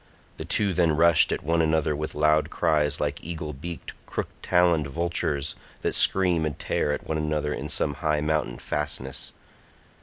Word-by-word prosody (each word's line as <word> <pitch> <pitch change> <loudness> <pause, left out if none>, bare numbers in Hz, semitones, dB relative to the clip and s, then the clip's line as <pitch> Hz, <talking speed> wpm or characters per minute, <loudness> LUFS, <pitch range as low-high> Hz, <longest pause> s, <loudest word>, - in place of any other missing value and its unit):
The - - -6
two 100 -3 +2
then 85 -3 +2
rushed 85 -1 +5
at - - -2
one 80 +2 +2
another 80 -1 +1
with 75 +1 -4
loud 75 +1 +3
cries 75 -2 +1
like - - -2
eagle 80 -2 -5
beaked 85 +5 -7
crook - - -3
taloned 85 -4 +3
vultures 75 -1 -1 0.3
that - - 0
scream 90 -4 +3
and 75 -3 -2
tear 75 - -1
at 75 - -3
one 80 0 -2
another 75 -1 -1
in - - -5
some 70 - 0
high 75 -1 +1
mountain 75 0 -1
fastness. 70 -3 -4
75 Hz, 170 wpm, -26 LUFS, 75-85 Hz, 0.3 s, rushed